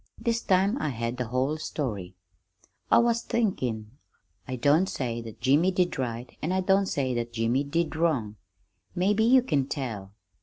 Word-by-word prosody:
This 235 -1 -1
time 195 +7 +2
I - - 0
had 115 -1 -3
the 125 -2 -2
whole 130 +6 -1
story. 105 - -4 0.7
"I - - +6
was 235 0 +3
thinkin' 125 - -1 0.6
I 130 - -3
don't 145 +9 +3
say 120 -3 -3
that 115 -2 -10
Jimmy 145 +8 +4
did 180 -5 0
right, 120 -1 -4
an' 160 - -1
I 190 0 +1
don't 195 +1 +3
say 130 -6 -1
that 120 0 -3
Jimmy 115 +4 +1
did 160 +3 -1
wrong. 135 -11 0 0.6
Maybe 200 +4 +2
you 250 +2 +5
can 140 - 0
tell. 110 -9 -5
140 Hz, 165 wpm, -27 LUFS, 120-185 Hz, 0.7 s, I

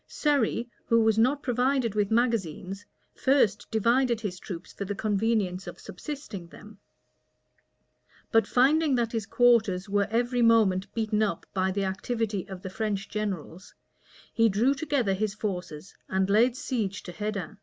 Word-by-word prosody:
Surrey, 260 -5 0 0.2
who 230 - +4
was 220 -1 +3
not 265 +5 +2
provided 250 -2 +1
with 205 -2 +1
magazines, 205 -5 -1 0.3
first 260 -7 +2
divided 235 +2 +2
his 195 -5 -5
troops 180 -3 -8
for - - -5
the 200 +1 -4
convenience 205 -3 0
of - - -8
subsisting 210 - -7
them; 210 +4 -14 1.5
but 225 0 +4
finding 285 +3 +3
that 235 -2 0
his 225 -4 -3
quarters 220 -6 +3
were 200 0 +1
every 240 +2 0
moment 210 -4 +3
beaten 220 -1 0
up 200 -6 -1
by 190 -1 +1
the 195 +1 -1
activity 205 +1 -2
of 190 -1 -8
the 190 - -5
French 205 -1 -3
generals, 190 -4 -5 0.6
he 225 -1 +4
drew 225 +7 +2
together 280 -8 0
his 210 +1 -2
forces, 180 -5 -5 0.2
and 190 +1 +1
laid 235 +4 +4
siege 220 -8 -3
to 180 - -7
Hedin. 210 -1 -5
215 Hz, 150 wpm, -27 LUFS, 195-235 Hz, 1.5 s, who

